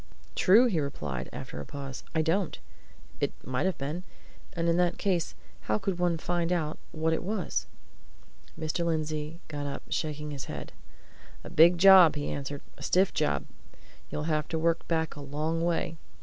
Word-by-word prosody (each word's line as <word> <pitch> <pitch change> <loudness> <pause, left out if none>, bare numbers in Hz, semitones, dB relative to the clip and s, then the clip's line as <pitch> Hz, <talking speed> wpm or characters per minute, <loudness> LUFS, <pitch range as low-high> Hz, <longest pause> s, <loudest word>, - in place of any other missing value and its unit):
"True!" 215 +7 +6
he 200 -10 +1
replied, 75 - -3
after 75 - -6
a - - -7
pause. 135 -2 -6
"I 160 - +3
don't! 170 +3 0 0.6
It - - 0
might 130 +8 0
have 190 - -1
been. 150 +6 -3 0.5
And 170 -1 -1
in 170 - +3
that 180 -1 +2
case 180 -5 0 0.3
how - - +2
could 195 -3 -2
one 175 -2 +2
find 175 +1 -1
out 160 -4 -1
what 160 0 0
it - - 0
was?" 195 -1 -2 0.9
Mr. 160 +2 -1
Lindsey 155 0 -2
got 145 -2 -4
up, 140 - -5
shaking 150 -1 -2
his 140 -2 -5
head. - - -6 0.7
"A - - -9
big 170 +3 +7
job!" 180 -4 +9
he 145 -1 -2
answered. 140 0 -5 0.2
"A - - -11
stiff 185 +7 +3
job! 70 -1 0 0.6
You'd 150 - -3
have 155 -1 0
to 165 - -2
work 165 +1 +1
back 160 -1 0
a 145 - -8
long 155 +4 -2
way. 170 -1 0
160 Hz, 175 wpm, -29 LUFS, 145-175 Hz, 0.9 s, job